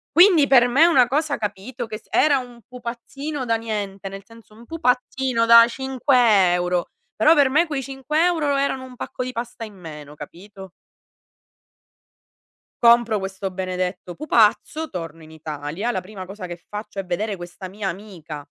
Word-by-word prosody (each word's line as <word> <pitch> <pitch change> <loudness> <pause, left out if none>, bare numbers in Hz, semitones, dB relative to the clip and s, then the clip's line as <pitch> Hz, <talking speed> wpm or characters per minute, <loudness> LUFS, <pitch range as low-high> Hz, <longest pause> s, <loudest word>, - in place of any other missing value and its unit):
Quindi 345 -3 +7
per 245 -3 +5
me 255 +5 +2
è - - +8
una 265 -8 +5
cosa, 290 +2 0
capito, 220 +4 -5
che 215 -1 -6
s 215 - -22
era 295 -2 +4
un 245 -2 -8
pupazzino 255 +4 -6
da 230 -1 +1
niente, 205 -4 -4
nel 195 0 -9
senso 230 0 -18
un 225 +2 -15
pupazzino 250 -4 0
da 230 0 +9
5 245 -7 +2
euro. 180 0 -1 0.3
Però 305 +9 +5
per 285 -4 +4
me 305 +6 +3
quei 295 -4 -3
5 275 +4 -1
euro 320 -5 +1
erano 275 -1 -1
un 255 -1 -11
pacco 255 - -5
di 255 - -5
pasta 235 -1 -6
in 215 - -12
meno, 150 -6 -10
capito? 190 +6 -12 2.1
Compro 235 -2 +5
questo 190 0 -4
benedetto 185 -1 -4
pupazzo, 300 - +1
torno 165 -3 -7
in 155 - -14
Italia. 155 +6 -5
La 185 - -3
prima 190 0 -9
cosa 190 0 -8
che 175 -1 -9
faccio 210 -1 -7
è 195 - -4
vedere 200 +3 -3
questa 175 +2 -9
mia 200 +1 -5
amica, 170 -7 -8
225 Hz, 170 wpm, -22 LUFS, 190-260 Hz, 2.1 s, da